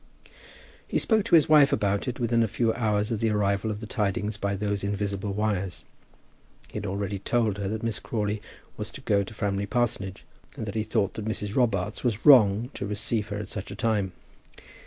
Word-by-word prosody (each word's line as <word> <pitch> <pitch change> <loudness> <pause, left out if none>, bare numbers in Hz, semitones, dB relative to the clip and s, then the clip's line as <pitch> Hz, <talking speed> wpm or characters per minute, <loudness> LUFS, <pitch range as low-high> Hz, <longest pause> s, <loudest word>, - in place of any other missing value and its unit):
He - - 0
spoke 220 -3 +2
to 230 - +5
his 155 - +6
wife 150 -2 +6
about 100 +3 0
it 125 0 -3
within 120 -1 +2
a 115 - +3
very - - -14
few 115 -2 +2
hours 105 -1 0
of 115 - -1
the 115 - +1
arrival 100 0 +1
of 105 0 -4
the - - -5
tidings 105 0 -1
by 100 -1 -2
those 100 0 -2
invisible 100 0 -2
wires. 100 -4 -2 0.8
He - - -7
had 105 - -5
already 100 +1 -3
told 110 -1 0
her 100 - -2
that 110 +1 -4
Miss 115 -2 -1
Crawley 105 -2 -2 0.4
was - - -4
to - - -8
go 100 -1 +2
to 105 - -10
Framley 100 -1 -1
parsonage, 105 -6 -1 0.3
and - - -4
that 100 - -5
he 110 - 0
thought 110 -2 0
that 110 - -6
Mrs. 105 -1 -3
Robarts 105 -8 0
was 115 -3 -1
wrong 120 -4 +6
to 100 - -4
receive 105 +1 -1
her 100 -1 -4
at 105 -1 -5
such 105 -1 -5
a - - -6
time. 105 -5 0
105 Hz, 210 wpm, -27 LUFS, 100-115 Hz, 0.8 s, his